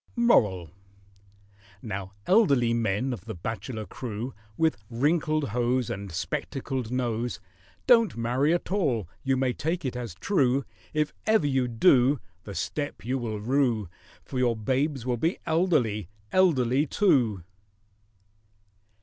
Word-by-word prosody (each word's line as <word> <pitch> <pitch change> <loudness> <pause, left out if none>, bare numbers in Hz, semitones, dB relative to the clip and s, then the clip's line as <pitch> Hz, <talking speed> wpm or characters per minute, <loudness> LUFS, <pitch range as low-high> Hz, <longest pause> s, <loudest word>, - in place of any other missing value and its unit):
MORAL. 100 - +3 1.1
Now, 100 -4 -5
elderly 140 - +4
men 115 +3 0
of 105 -4 -8
the 110 - -6
bachelor 110 +4 -5
crew, 120 +4 -5 0.2
With 160 -1 +2
wrinkled 150 +3 +1
hose 120 +2 0
And 100 -1 -5
spectacled 130 - -3
nose, 120 -5 -1 0.5
Don't 230 - +5
marry 125 +6 +1
at 175 +1 -1
all—you 135 - 0
may 130 -1 +1
take 165 +4 -2
it 125 - -2
as 120 -8 -5
true 135 - +1 0.3
If 150 -1 0
ever 220 -7 +4
you 135 -3 +1
do 130 +2 +4 0.3
The 100 - -7
step 145 - -4
you 130 +2 -1
will 110 -3 -3
rue, 120 -4 +1 0.3
For 130 - -4
your 120 -2 +2
babes 130 +4 -1
will 125 -1 0
be 165 +9 0
elderly—elderly 130 - +1
too. 120 - +2
125 Hz, 125 wpm, -27 LUFS, 110-145 Hz, 1.1 s, Don't